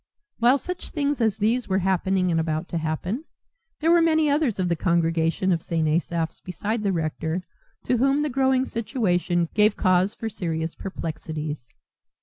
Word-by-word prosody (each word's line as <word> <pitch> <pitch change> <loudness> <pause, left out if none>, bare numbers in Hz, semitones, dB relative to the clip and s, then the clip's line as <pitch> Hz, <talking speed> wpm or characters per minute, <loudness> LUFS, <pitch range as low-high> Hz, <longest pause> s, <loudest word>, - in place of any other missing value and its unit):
While 245 +4 +5
such 360 +5 -5
things 290 -3 -1
as 220 -3 +2
these 230 +4 +1
were 190 - +2
happening 190 -1 +1
and 165 - +2
about 160 +1 -1
to 170 - -2
happen, 175 - -3 0.6
there 325 +2 +3
were 340 0 +6
many 315 -2 +3
others 285 -7 +1
of 185 -2 0
the 170 - +1
congregation 165 +2 +1
of 170 -2 +1
St. 165 -2 -1
Asaph's 165 +1 -1
beside 210 +5 -3
the 200 -2 +1
rector 160 +1 -2 0.4
to 250 - +1
whom 275 +4 +2
the 300 - 0
growing 265 0 +2
situation 180 -8 0
gave 210 0 +3
cause 185 +2 +2
for 225 - -4
serious 165 -6 -3
perplexities. 155 -7 -6
190 Hz, 165 wpm, -24 LUFS, 165-245 Hz, 0.6 s, were